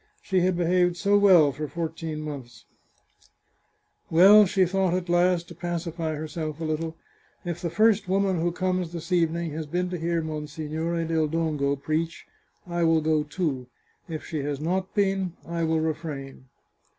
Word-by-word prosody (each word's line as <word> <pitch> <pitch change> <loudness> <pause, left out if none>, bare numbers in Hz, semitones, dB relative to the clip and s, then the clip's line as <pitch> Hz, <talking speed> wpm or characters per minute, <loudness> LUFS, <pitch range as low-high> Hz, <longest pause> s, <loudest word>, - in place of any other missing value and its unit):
She 190 -2 +1
had 180 0 +1
behaved 175 0 +2
so 200 +2 +2
well 185 -8 +6
for 150 +3 -5
fourteen 160 -1 -4
months! 130 -7 -8 0.7
" - - -49 0.7
Well," 200 +5 +8
she 185 +1 +3
thought 185 0 +1
at 180 -1 -3
last, 175 0 +2
to - - -9
pacify 170 -1 -3
herself 155 0 -5
a - - -4
little, 160 +1 -3 0.2
" - - -36
if 175 -1 -4
the 170 - -2
first 215 +2 +3
woman 190 -2 +1
who 175 +1 +1
comes 185 -1 -1
this 170 +2 -7
evening 170 -1 +1
has 155 0 -5
been 180 +3 -2
to 180 - -3
hear 165 0 -1
Monsignore 155 +2 -3
del 160 -1 +1
Dongo 150 -3 0
preach 155 +4 -3 0.4
I 175 -1 -1
will 165 -1 +4
go 155 0 +2
too; 150 -4 -3 0.4
if 155 -2 -5
she 155 - -4
has 140 0 -3
not 185 +4 -2
been, 195 -3 +1
I 170 0 -3
will 160 0 +1
re 160 0 +1
frain." 135 -4 -8
165 Hz, 175 wpm, -26 LUFS, 155-180 Hz, 0.7 s, Well